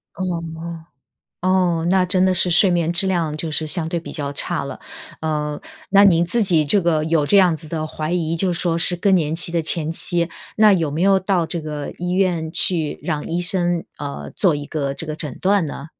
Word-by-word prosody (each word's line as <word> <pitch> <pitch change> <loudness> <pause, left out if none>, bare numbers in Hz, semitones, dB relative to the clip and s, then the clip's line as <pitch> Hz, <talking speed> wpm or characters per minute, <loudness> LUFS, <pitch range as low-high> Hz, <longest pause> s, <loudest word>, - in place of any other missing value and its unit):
哦 190 - -3 0.3
哦。 165 0 -8 0.6
哦， 180 -3 +1
那 190 -1 +3
真 180 0 +1
的 185 - +2
是 180 0 +3
睡 180 +3 +4
眠 170 -1 0
质 175 +3 0
量 170 -5 -1
就 155 +1 -4
是 155 +1 0
相 160 0 +2
对 170 - -2
比 165 - -9
较 145 -3 -4
差 - - -3
了。 - - -7 0.4
呃， 150 -1 -2 0.3
那 200 +1 +5
您 170 -4 +4
自 220 +7 +1
己 165 -7 +2
这 195 +7 +2
个 165 -3 +1
有 160 -1 +1
这 200 - +4
样 180 -4 +4
子 155 - -12
的 155 0 -4
怀 155 +1 -4
疑 165 -2 -1
就 180 +2 0
说 170 -1 -1
是 170 +1 +1
更 190 +3 +2
年 160 -4 0
期 170 +1 +2
的 170 -1 -1
前 160 0 0
期， 170 +1 +2 0.3
那 215 -1 +6
有 165 -5 -1
没 150 +3 -4
有 195 +1 +4
到 185 -3 0
这 165 0 -5
个 150 -2 -5
医 180 0 -3
院 180 -4 0
去 165 -3 +2
让 150 -4 -3
医 170 +2 -2
生， 175 -2 +3
呃， 140 - -6
做 180 -5 +3
一 145 0 -5
个 140 -3 -3
这 165 - -7
个 155 0 -5
诊 150 -5 -7
断 195 -1 +2
呢？ 145 -1 -7
170 Hz, 240 characters per minute, -20 LUFS, 155-180 Hz, 0.6 s, 那